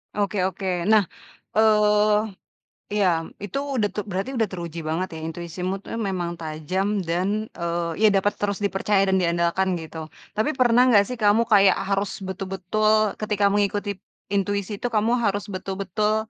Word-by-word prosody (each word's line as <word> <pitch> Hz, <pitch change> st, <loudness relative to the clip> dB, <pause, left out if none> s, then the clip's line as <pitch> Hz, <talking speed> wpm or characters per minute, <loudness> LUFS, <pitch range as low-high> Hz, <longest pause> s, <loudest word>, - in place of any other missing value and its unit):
Oke 205 Hz, 0 st, -1 dB
oke, 190 Hz, +1 st, -6 dB, 0.2 s
nah, 215 Hz, -1 st, +5 dB, 0.5 s
eee, 210 Hz, -1 st, +3 dB, 0.5 s
ya 195 Hz, -, +4 dB, 0.4 s
itu 205 Hz, +5 st, -4 dB, 0.2 s
udah 215 Hz, -4 st, +2 dB
tuh 210 Hz, -, -2 dB
berarti 190 Hz, +5 st, -2 dB
udah 225 Hz, -, +3 dB
teruji 170 Hz, -2 st, -6 dB
banget 175 Hz, +4 st, -1 dB
ya, -, -, -7 dB
intuisimu 170 Hz, +3 st, -4 dB
tuh 230 Hz, -, -7 dB
memang 180 Hz, -3 st, -2 dB
tajam 160 Hz, +4 st, -2 dB, 0.2 s
dan, 195 Hz, +6 st, -1 dB
eee, 170 Hz, 0 st, -2 dB
ya 220 Hz, -, +7 dB
dapat 200 Hz, +1 st, +2 dB
terus 205 Hz, 0 st, -2 dB
dipercaya 195 Hz, 0 st, +1 dB
dan 190 Hz, -, +3 dB
diandalkan 170 Hz, +2 st, +1 dB
gitu, 160 Hz, 0 st, -9 dB, 0.4 s
tapi 215 Hz, +7 st, +2 dB
pernah 245 Hz, -2 st, +4 dB
gak 200 Hz, -1 st, +7 dB
sih 250 Hz, -, -4 dB
kamu 210 Hz, +1 st, +4 dB
kayak 200 Hz, -3 st, +6 dB, 0.2 s
harus 200 Hz, 0 st, -1 dB
betul-betul 195 Hz, +3 st, 0 dB
ketika 210 Hz, -1 st, 0 dB
mengikuti 205 Hz, 0 st, 0 dB, 0.3 s
intuisi 200 Hz, +1 st, -1 dB
itu 245 Hz, -, -2 dB
kamu 225 Hz, +3 st, +2 dB
harus 205 Hz, 0 st, -1 dB
betul-betul 200 Hz, +3 st, -2 dB
200 Hz, 150 wpm, -24 LUFS, 185-210 Hz, 0.5 s, ya